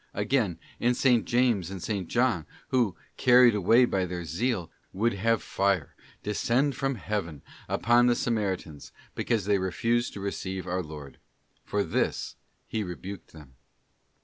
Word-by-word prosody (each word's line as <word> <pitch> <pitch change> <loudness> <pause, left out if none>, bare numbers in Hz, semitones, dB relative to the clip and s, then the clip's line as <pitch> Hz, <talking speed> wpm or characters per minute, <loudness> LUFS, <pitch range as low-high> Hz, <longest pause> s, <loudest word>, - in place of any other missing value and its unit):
* - - -39
Again, 105 -4 +1 0.2
in 120 +1 +3
S. - - -4 0.2
James 120 -8 +2
and 95 -2 -6
8. 100 -5 -2
John, 120 -9 +1 0.2
who, 120 -8 +2 0.2
carried 125 -1 +6
away 115 +5 +5
by 95 -5 0
their 90 -1 -5
zeal, 90 - -2 0.2
would 115 +5 +1
have 115 +3 +1
fire 100 -5 0 0.3
descend 120 +6 +1
from 135 0 -1
heaven 95 - -4 0.3
upon 120 +1 +4
the 120 - +4
Samaritans, 95 - -2 0.2
because 110 -5 -1
they 100 -1 +2
refused 115 +6 0
to - - -7
receive 95 -2 -4
our 95 0 -1
Lord. 75 -4 -10 0.4
For 105 0 -1
this - - -1 0.3
He 110 - -2
rebuked 95 +1 -8
them. 75 -5 -14
100 Hz, 150 wpm, -28 LUFS, 90-120 Hz, 0.4 s, carried